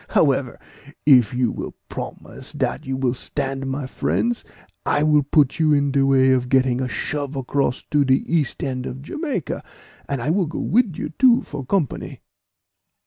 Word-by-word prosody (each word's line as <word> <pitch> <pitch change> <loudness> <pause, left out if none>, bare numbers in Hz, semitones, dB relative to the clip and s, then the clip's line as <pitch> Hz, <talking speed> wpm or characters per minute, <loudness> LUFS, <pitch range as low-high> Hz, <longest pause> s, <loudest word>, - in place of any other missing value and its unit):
"However, 135 -4 +2 0.5
if 125 -7 +6
you 125 -2 +1
will - - -6
promise - - -8
dat - - -2
you 130 0 -2
will 130 -2 +1
stand 135 +1 -4
my 135 +1 -3
friends, 235 - -1 0.4
I 145 - +1
will 150 -1 +4
put 145 +1 +2
you 155 -2 +4
in 140 -1 +2
de 135 0 +2
way 135 -1 +4
of 125 -1 +1
getting 130 -1 +2
a 130 - -1
shove 145 +1 -3
across 135 -1 -1
to 145 -1 +4
de 130 -1 +4
east 155 -2 -1
end 130 -2 -3
of 130 +2 -7
Jamaica; 285 - -3 0.5
and 140 - -1
I 130 +6 0
will 185 -1 +1
go 160 - -6
wid 215 -7 +1
you 150 - -3
too, 250 -2 +5
for 145 -2 -6
company." 155 - -2
140 Hz, 175 wpm, -22 LUFS, 130-150 Hz, 0.5 s, if